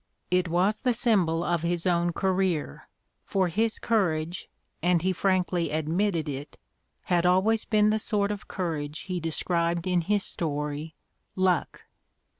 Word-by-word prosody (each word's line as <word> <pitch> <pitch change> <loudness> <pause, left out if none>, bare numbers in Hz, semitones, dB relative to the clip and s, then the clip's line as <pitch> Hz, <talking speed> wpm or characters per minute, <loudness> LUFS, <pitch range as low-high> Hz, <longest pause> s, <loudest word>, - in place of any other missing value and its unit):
It 180 0 +2
was 185 +6 +1
the 250 -2 +1
symbol 180 -9 +2
of 175 -2 0
his 170 +1 -1
own 175 -1 +2
career, 185 - -1 0.3
for 190 -2 0
his 220 +5 0
courage, 175 -6 -1 0.3
and 175 0 +2
he 190 0 +2
frankly 180 -2 +1
admitted 160 +3 0
it, 140 +1 -6 0.5
had 175 -1 +2
always 205 +5 +3
been 215 -1 +3
the 220 - +1
sort 210 -2 0
of 205 -1 -6
courage 155 -5 -3
he 185 -2 -4
described 170 +1 0
in 180 -1 +2
his 205 +3 +1
story 150 0 -3 0.4
"Luck." 185 -2 0
180 Hz, 140 wpm, -27 LUFS, 165-195 Hz, 0.5 s, always